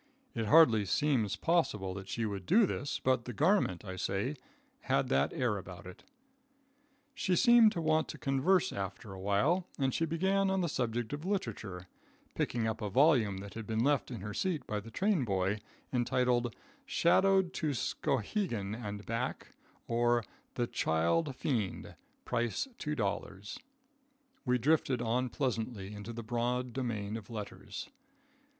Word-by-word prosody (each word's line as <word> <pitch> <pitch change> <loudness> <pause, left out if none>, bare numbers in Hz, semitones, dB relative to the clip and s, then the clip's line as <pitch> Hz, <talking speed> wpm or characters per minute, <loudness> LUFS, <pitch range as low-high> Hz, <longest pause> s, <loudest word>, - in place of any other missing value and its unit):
It 115 -2 -2
hardly 120 -7 +7
seems 125 -8 +1
possible 105 - +1
that 95 0 -8
she 115 - -1
would 100 -3 -4
do 220 +2 +6
this, 145 -6 -2
but 130 -3 +1
the 125 - -5
garment, 150 - +2
I 95 -1 -6
say, 100 +9 -1 0.4
had - - 0
that 70 +1 +2
air 120 -5 0
about 90 -2 -10
it. 90 0 -11 1.1
She 185 -9 0
seemed 235 0 +7
to 170 - -2
want 155 0 +2
to - - -7
converse 175 +7 +2
after 95 +1 -5
awhile, 105 - +1
and 135 -3 +1
she 165 - +1
began 190 +4 +1
on 190 0 +1
the 170 - 0
subject 120 -1 -2
of 145 +2 -4
literature, 110 - -3 0.5
picking 120 -2 -1
up 110 0 -2
a 105 - -2
volume 125 -5 +4
that 100 0 -9
had 110 -2 -7
been 110 +1 0
left 145 0 +2
in 120 -6 -6
her 105 +1 -5
seat 180 - -1
by 105 - -2
the 110 +2 -10
train 190 - +1
boy, 100 -1 0 0.3
entitled: 125 -1 +1 0.3
"Shadowed 190 -5 +3
to 150 -4 -1
Skowhegan 115 - -1
and 105 -3 -6
Back; 115 +3 -3 0.4
or, 120 0 +2 0.3
The - - +1
Child 85 - +1
Fiend; 115 -9 -2 0.3
price 120 - -1
$2," 100 -7 -3 0.9
we 125 -1 +3
drifted 135 -1 +2
on 120 +2 0
pleasantly 115 -6 -2
into 105 +2 -7
the 115 0 -6
broad 120 +2 -1
domain 110 -5 -3
of 110 - -11
letters. 100 -3 -6
120 Hz, 150 wpm, -32 LUFS, 105-150 Hz, 1.1 s, hardly